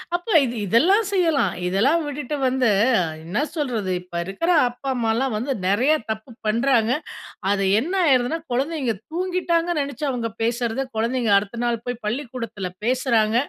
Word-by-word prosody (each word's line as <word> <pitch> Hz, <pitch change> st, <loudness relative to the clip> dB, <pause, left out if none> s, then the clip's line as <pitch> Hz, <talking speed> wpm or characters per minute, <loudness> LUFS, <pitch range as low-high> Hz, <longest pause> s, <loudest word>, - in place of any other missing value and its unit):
அப்ப 350 Hz, +3 st, -4 dB, 0.2 s
இது 245 Hz, -3 st, -2 dB
இதெல்லாம் 370 Hz, -, +4 dB
செய்யலாம். 320 Hz, -, +2 dB
இதெல்லாம் 260 Hz, -, +2 dB
விட்டுட்டு 290 Hz, 0 st, -4 dB
வந்து 255 Hz, -2 st, +2 dB, 0.6 s
என்ன 175 Hz, +8 st, -2 dB, 0.2 s
சொல்றது 240 Hz, -, -2 dB
இப்ப 175 Hz, -1 st, -5 dB
இருக்கிற 195 Hz, -, -1 dB, 0.2 s
அப்பா, 260 Hz, +3 st, -7 dB
அம்மாலாம் 235 Hz, +1 st, 0 dB
வந்து 260 Hz, +6 st, -1 dB
நிறைய 240 Hz, +10 st, +3 dB, 0.2 s
தப்பு 220 Hz, +3 st, -6 dB, 0.2 s
பண்றாங்க. 235 Hz, +1 st, +2 dB, 0.6 s
அது 195 Hz, -1 st, +1 dB
என்ன 320 Hz, +11 st, -3 dB
ஆயிருதுன்னா, 260 Hz, +3 st, +2 dB
குழந்தைங்க 270 Hz, -2 st, -1 dB, 0.2 s
தூங்கிட்டாங்கன்னு 345 Hz, -3 st, 0 dB
நினைச்சு 280 Hz, +1 st, -5 dB
அவங்க 240 Hz, -3 st, -2 dB
பேசுறத 235 Hz, +2 st, -1 dB
குழந்தைங்க 230 Hz, 0 st, 0 dB
அடுத்த 210 Hz, +4 st, -3 dB
நாள் 235 Hz, -1 st, -1 dB
போய் 245 Hz, -1 st, -4 dB
பள்ளிக்கூடத்தில 230 Hz, -6 st, -4 dB
பேசுறாங்க. 235 Hz, -3 st, +2 dB
245 Hz, 140 wpm, -22 LUFS, 225-290 Hz, 0.6 s, இதெல்லாம்